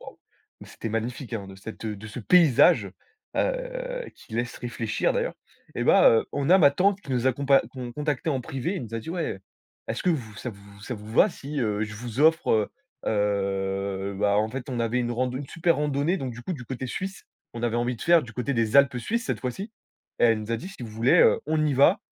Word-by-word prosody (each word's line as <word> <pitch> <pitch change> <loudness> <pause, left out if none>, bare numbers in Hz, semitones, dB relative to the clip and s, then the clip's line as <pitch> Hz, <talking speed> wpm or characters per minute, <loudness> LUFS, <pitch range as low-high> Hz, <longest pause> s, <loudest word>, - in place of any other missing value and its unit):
waouh - - -12 0.4
mais - - -11
c'était 115 - -6
magnifique, 120 +2 -3
hein, 100 -3 -4
de 95 - -10
cette, 105 +4 -9
heu, 110 -1 -2
de 110 +2 -10
ce 105 - -7
paysage, 155 - +5 0.5
heu, - - -2
qui - - -17
laisse 120 +1 -2
réfléchir, 115 -3 -1
d'ailleurs. - - -1 0.4
Eh - - -2
ben, - - +6 0.2
heu, - - -7
on 140 0 -1
a 185 - +8
ma 145 -6 +7
tante 190 +6 +2
qui 135 - -6
nous 125 +1 +1
a - - +2
compa 140 +1 +3
con 125 -2 -7
contacté 150 +1 -2
en 135 -3 0
privé. 135 +10 -3
Elle 160 - -4
nous 115 0 -8
a - - -1
dit: 115 +9 -7
«Ouais, 170 - -3 0.5
est-ce - - -3
que - - +1
vous 115 -10 -3
ça 125 - -5
vous 100 -1 -15
ça 120 +4 -5
vous 105 +1 -10
va - - +6
si, 145 0 -5
heu, 105 -2 0
je 105 0 -8
vous 115 +1 -7
offre» 160 +2 +4
heu 110 -2 +3 0.4
heu, 100 -1 -1
bah, 100 0 +3
en 110 +1 +1
fait, 135 +3 -6
on 120 -2 -2
avait 115 +2 0
une 120 -1 -1
rand 125 +1 0
une 130 +3 -5
super 165 +3 +1
randonnée 150 +4 0
donc 130 -8 -4
du 120 +1 -10
coup, 180 - -3
du 125 -5 -8
côté 130 +1 -5
suisse, 190 +9 -5 0.3
on 115 - -7
avait 120 -1 0
envie 120 +1 0
de - - -17
faire 170 -1 +5
du 115 - -10
côté 125 +4 -2
des 115 +1 +1
Alpes 140 -3 +5
suisses, 230 - -2
cette - - -2
fois-ci 160 - -4 0.5
et - - +4
elle 115 -2 +4
nous 105 +1 -7
a - - +1
dit: 180 - -7
«Si 195 - -12
vous 115 - -6
voulez, 115 +4 +3
heu, - - +5
on 155 0 +1
y 145 - +1
va, 165 +10 +5
125 Hz, 245 wpm, -26 LUFS, 110-150 Hz, 0.5 s, a